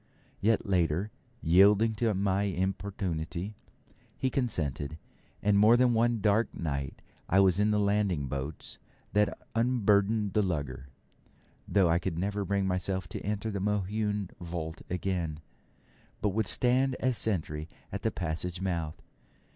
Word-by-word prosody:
Yet, 110 +1 +2
later, 90 +1 +1 0.3
yielding 100 +6 +5
to 115 -1 +2
my 95 0 +1
importunity, 95 -1 -3 0.6
he 130 - 0
consented; 80 - -2 0.5
and 100 -1 +4
more 110 +3 +7
than 125 -1 +4
one 115 -1 +2
dark 105 +3 +2
night 70 -4 -4 0.3
I 95 - +4
was 95 -1 +4
in 105 +1 +3
the 105 0 +2
landing 100 -7 +1
boats 70 +3 -5 0.3
that 105 +1 +2 0.2
unburdened 105 -3 +2
the 105 - +3
lugger, 70 -8 -3 0.8
though 95 -3 +3
I 85 +1 +3
could 90 -2 -3
never 100 +3 -1
bring 100 0 0
myself 95 0 -1
to - - -6
enter 105 +2 -2
the 100 - -3
Mohune 105 0 -1
vault 85 -2 -5
again, 90 -4 -2 0.8
but 105 - +1
would 105 +1 0
stand 130 +4 +2
as 130 -1 0
sentry 80 -8 -1 0.2
at - - -4
the - - +1
passage 85 +1 -3
mouth. 85 -5 -2
95 Hz, 140 wpm, -30 LUFS, 85-105 Hz, 0.8 s, more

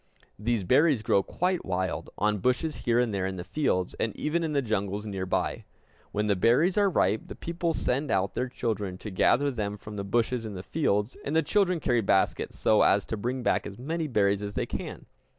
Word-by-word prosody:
These 115 -1 0
berries 135 - +3
grow 100 - +3
quite 180 - -1
wild, 95 0 -2
on 105 0 +1
bushes 125 - 0
here 120 0 +4
and 120 -3 +1
there 95 -1 0
in 95 - -4
the 90 - -5
fields, 95 -9 0
and 110 - -1
even 165 +3 0
in 160 -2 -2
the 140 - +2
jungles 105 -2 -2
near 95 -3 -4
by. - - -1 0.5
When 105 +1 0
the 105 -1 +2
berries 125 - +3
are 205 -1 +4
ripe, 105 - +1
the - - -8
people 170 -1 -2
send 140 +4 -1
out 95 0 +1
their 125 - -2
children 105 -6 -3
to 105 - -7
gather 140 +9 +3
them 105 -4 -3
from 105 +1 -9
the 100 - -2
bushes 115 +4 0
in 110 -3 -6
the 90 - -6
fields; 105 -7 0
and 145 - -2
the 160 - +4
children 185 -4 +2
carry 120 -5 +2
baskets 95 -2 +1
so 110 - +4
as 100 - +4
to - - -3
bring 125 +4 -3
back - - +1
as 100 -1 -9
many 160 +5 -2
berries 100 -5 +2
as 100 0 -5
they - - 0
can. - - -6
110 Hz, 220 wpm, -28 LUFS, 100-145 Hz, 0.5 s, here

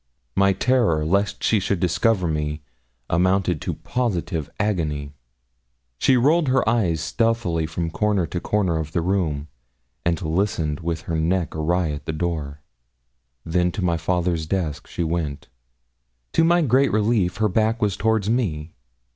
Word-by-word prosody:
My 100 0 +4
terror 105 -8 +2
lest 100 +5 0
she 110 - +3
should 95 -1 -1
discover 90 +2 +2
me 75 -1 -2 0.4
amounted 90 -1 +1
to - - -3
positive 90 - -2
agony. 75 -9 -1 0.9
She 130 - +4
rolled 150 +6 +3
her 130 -3 +2
eyes 100 -9 +2
stealthily 100 -3 0
from 80 +1 -3
corner 105 -1 +1
to 90 - -4
corner 95 -4 0
of 80 -1 -5
the 85 - +1
room, 80 -5 -1 0.6
and 85 -1 +1
listened 80 -3 -1
with 85 -1 -3
her 80 -1 -2
neck 85 +1 0
awry 80 +1 0
at 75 0 -7
the 80 - -1
door. 75 -3 -3 0.8
Then 90 +1 +1
to 100 - -3
my 85 -1 +2
father's 85 -2 -1
desk 85 -5 -2
she 85 - -3
went. 80 -3 -3 0.8
To 165 - +4
my 170 +1 +4
great 135 +1 +3
relief, 105 -4 +1
her 110 - +2
back 110 +3 +1
was 105 -3 +1
towards 110 -1 +1
me. 85 -10 -1
90 Hz, 150 wpm, -23 LUFS, 80-105 Hz, 0.9 s, My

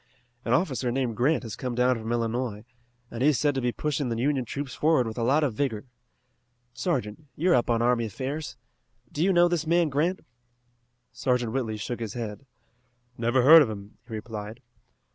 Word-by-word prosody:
An 115 - -1
officer 130 -5 +1
named 125 -3 -1
Grant 130 +4 +1
has 115 -3 -6
come 125 -2 -4
down 125 +1 +3
from 110 +1 -5
Illinois, 115 -2 -2 0.5
and 115 - -6
he 145 - +5
is 145 - +2
said 145 -1 +2
to 135 - -2
be 125 0 0
pushing 145 -1 -2
the 115 - -2
Union 135 +1 0
troops 140 +1 -5
forward 150 -1 +2
with 110 -1 -5
a 120 - -3
lot 140 +6 +3
of 135 -6 0
vigor. 115 -2 -2 0.9
Sergeant, 130 - -3
you 175 +4 +1
are - - +6
up 125 0 +2
on 115 -1 +2
army 120 -1 +2
affairs. 130 +5 -5 0.5
Do 150 - -1
you 195 - +3
know 175 -1 +5
this 170 -2 -1
man 170 -1 +3
Grant?" 160 +7 0 0.9
Sergeant 125 -3 0
Whitley 115 -5 -2
shook 120 +3 -4
his 110 -4 -4
head. 115 +2 -6 0.7
"Never 120 +2 +1
heard 160 +4 +10
of 135 - +2
him," 100 0 -9
he 115 - -9
replied. 110 0 -7
125 Hz, 195 wpm, -26 LUFS, 115-145 Hz, 0.9 s, heard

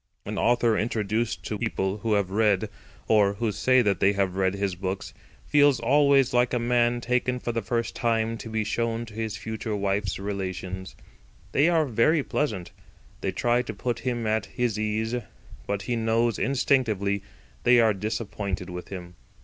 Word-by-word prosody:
An - - -3
author 120 -1 +3
introduced 110 +1 -1
to 105 - -3
people 100 -3 -1
who 110 0 0
have 100 -2 +1
read—or 105 0 +1
who 110 +1 -1
say 130 +5 +3
that 100 -4 +1
they 100 +1 +4
have 95 -2 0
read—his 95 0 0
books, 95 +2 -4 0.3
feels 145 -4 +4
always 140 -1 +4
like 125 0 +3
a - - +2
man 120 0 +2
taken 125 +1 0
for 120 - -3
the 115 0 -1
first 115 +3 -2
time 115 -1 0
to 115 - -7
be 110 -1 -1
shown 115 +2 -1
to 110 - -13
his 110 -1 -3
future 110 -1 -4
wife's 100 -1 -1
relations. 95 -2 -5 0.6
They 145 +5 +4
are 165 -3 +3
very 140 +5 +2
pleasant. 105 -14 -2 0.5
They - - -1
try 120 0 +1
to 110 -3 -6
put 120 +3 -2
him 120 -2 -2
at 110 0 0
his 120 -4 -1
ease. 110 +2 -1 0.5
But 100 -1 -2
he 120 - -1
knows 115 0 +1
instinctively 115 -7 +1 0.4
they 125 0 +5
are 110 -2 +4
disappointed 100 -3 -4
with 90 0 -7
him. 90 -2 -8
110 Hz, 165 wpm, -26 LUFS, 100-120 Hz, 0.6 s, they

